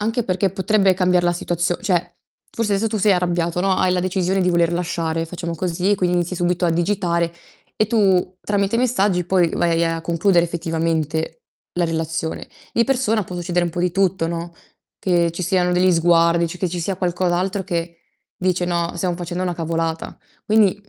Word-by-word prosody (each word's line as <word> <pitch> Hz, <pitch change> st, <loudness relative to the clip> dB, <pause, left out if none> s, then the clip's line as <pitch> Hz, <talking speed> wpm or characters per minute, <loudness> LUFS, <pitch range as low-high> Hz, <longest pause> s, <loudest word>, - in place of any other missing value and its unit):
Anche 225 Hz, +3 st, 0 dB
perché 190 Hz, -2 st, 0 dB
potrebbe 195 Hz, 0 st, +2 dB
cambiar 180 Hz, -1 st, +2 dB
la 175 Hz, -, +3 dB
situazio 175 Hz, 0 st, -1 dB
cioè, 180 Hz, -5 st, -1 dB, 0.4 s
forse 230 Hz, -3 st, -1 dB
adesso 200 Hz, +3 st, +1 dB
tu 220 Hz, -1 st, -1 dB
sei 200 Hz, +1 st, +4 dB
arrabbiato, 175 Hz, -1 st, 0 dB
no, 195 Hz, 0 st, +2 dB
hai 185 Hz, -, +2 dB
la 180 Hz, -, +1 dB
decisione 185 Hz, +1 st, 0 dB
di 180 Hz, -, +2 dB
voler 170 Hz, -1 st, +2 dB
lasciare, 165 Hz, -2 st, -1 dB
facciamo 170 Hz, -1 st, -5 dB
così, 180 Hz, +3 st, -1 dB
e -, -, +5 dB
quindi 180 Hz, -1 st, +1 dB
inizi 175 Hz, +1 st, -1 dB
subito 175 Hz, +1 st, 0 dB
a 170 Hz, -, +3 dB
digitare 170 Hz, -1 st, 0 dB, 0.4 s
e 215 Hz, -, +1 dB
tu 190 Hz, -5 st, +2 dB
tramite 205 Hz, +1 st, 0 dB
i -, -, 0 dB
messaggi 205 Hz, -7 st, +1 dB
poi 180 Hz, -1 st, +2 dB
vai 170 Hz, -1 st, +1 dB
a 165 Hz, 0 st, -1 dB
concludere 170 Hz, +2 st, +2 dB
effettivamente 165 Hz, -, -2 dB, 0.3 s
la 175 Hz, -1 st, 0 dB
relazione. 160 Hz, 0 st, -3 dB, 0.3 s
Di 235 Hz, -, +3 dB
persona 245 Hz, -5 st, +1 dB
può 180 Hz, -, -8 dB
succedere 175 Hz, 0 st, 0 dB
un 170 Hz, -, -2 dB
po' 175 Hz, -, -3 dB
di 180 Hz, 0 st, +1 dB
tutto, 185 Hz, -2 st, +1 dB
no? 170 Hz, 0 st, -5 dB, 0.5 s
Che 170 Hz, -3 st, +2 dB
ci 180 Hz, -, -5 dB
siano 180 Hz, 0 st, +1 dB
degli 180 Hz, +1 st, +3 dB
sguardi, 170 Hz, 0 st, +3 dB
cioè, 175 Hz, +2 st, -7 dB
che 185 Hz, -, 0 dB
ci 175 Hz, -, -4 dB
sia 185 Hz, +2 st, -2 dB
qualcos'altro 180 Hz, +2 st, -1 dB
che, 170 Hz, -2 st, -3 dB, 0.4 s
dice: 180 Hz, -1 st, 0 dB
"No, 170 Hz, -1 st, -1 dB
stiam 175 Hz, 0 st, -1 dB
facendo 175 Hz, +1 st, -4 dB
una 180 Hz, -1 st, -1 dB
cavolata". 165 Hz, 0 st, -3 dB, 0.3 s
Quindi, 210 Hz, -3 st, +3 dB
mh 205 Hz, -, -30 dB
175 Hz, 195 wpm, -21 LUFS, 170-190 Hz, 0.5 s, e